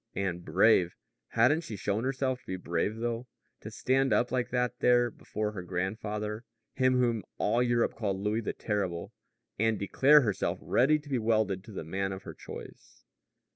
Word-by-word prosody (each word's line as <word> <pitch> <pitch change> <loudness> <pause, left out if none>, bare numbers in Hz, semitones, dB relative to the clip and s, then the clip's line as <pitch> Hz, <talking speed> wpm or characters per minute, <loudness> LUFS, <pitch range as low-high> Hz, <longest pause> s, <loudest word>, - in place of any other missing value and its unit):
And 90 -2 -2
brave! 90 +1 +4 0.3
Hadn't 130 +8 +3
she 115 -10 -7
shown 105 +4 -1
herself 130 -1 -1
to - - -29
be 95 - -3
brave 90 +3 -1
though 120 +1 -3 0.3
to - - -8
stand 135 +1 +1
up 120 - +2
like 125 -1 0
that 125 0 -1
there 120 -1 +4
before 105 0 -4
her 100 -4 -6
grandfather, 105 +4 -3 0.3
him 130 -1 +3
whom 120 -3 +2 0.2
all 115 +4 +2
Europe 120 -1 +2
called 100 -4 -2
Louis 105 +3 0
the - - -3
Terrible, 95 -5 -3 0.5
and 110 0 +2
declare 135 +10 +5
herself 105 -7 -1
ready 145 +5 +3
to 150 0 -13
be 135 -3 0
welded 110 -4 +1
to - - -11
the 95 - -5
man 95 +4 -2
of 95 - -8
her - - -8
choice! - - -11
110 Hz, 175 wpm, -30 LUFS, 100-125 Hz, 0.5 s, declare